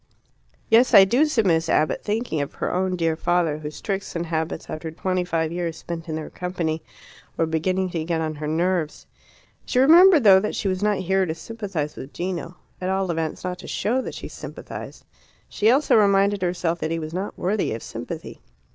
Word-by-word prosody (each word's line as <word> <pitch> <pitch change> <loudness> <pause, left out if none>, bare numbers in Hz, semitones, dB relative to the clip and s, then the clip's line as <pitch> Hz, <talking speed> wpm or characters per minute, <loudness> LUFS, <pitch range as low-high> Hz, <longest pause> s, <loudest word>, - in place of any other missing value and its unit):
"Yes, 235 +3 +5
I 195 - +10
do," 250 +10 +3
said 240 -8 +1
Miss 165 -2 +2
Abbott, 155 - +1
thinking 210 -7 -1
of 140 - -5
her - - -2
own 185 0 0
dear 165 -2 0
father, 170 -2 0
whose 150 0 -7
tricks 195 -3 -4
and 170 0 -2
habits, 160 -1 -3
after 160 +1 -5
twenty 185 +3 -1
five 165 -2 -1
years 170 -2 -3
spent 165 0 -7
in 155 - -2
their 155 -1 -6
company, 170 -3 -3 0.6
were 165 - +2
beginning 180 +4 -1
to 165 -2 -2
get 165 0 -1
on 160 -1 -2
her 150 0 -4
nerves. 165 0 -1 0.6
She - - -3
remembered, 330 +3 +7
though, 195 -3 +8
that 210 - -3
she - - -2
was 185 0 -1
not 210 -1 +2
here 190 0 +1
to 160 - -3
sympathize 190 -6 -5
with 135 - -9
Gino 175 -1 -4 0.2
at 185 - -1
all 190 -1 0
events, 160 -2 -3
not 180 -1 -4
to - - -10
show 245 +5 0
that - - -6
she - - -7
sympathized. - - -9 0.4
She 215 - +1
also 275 +5 +4
reminded 200 -1 +3
herself 175 -1 -1
that 155 - -2
he 165 - -1
was 155 0 -6
not 190 +3 -4
worthy 195 +3 0
of 110 - -5
sympathy. - - -7
180 Hz, 200 wpm, -23 LUFS, 160-195 Hz, 0.6 s, I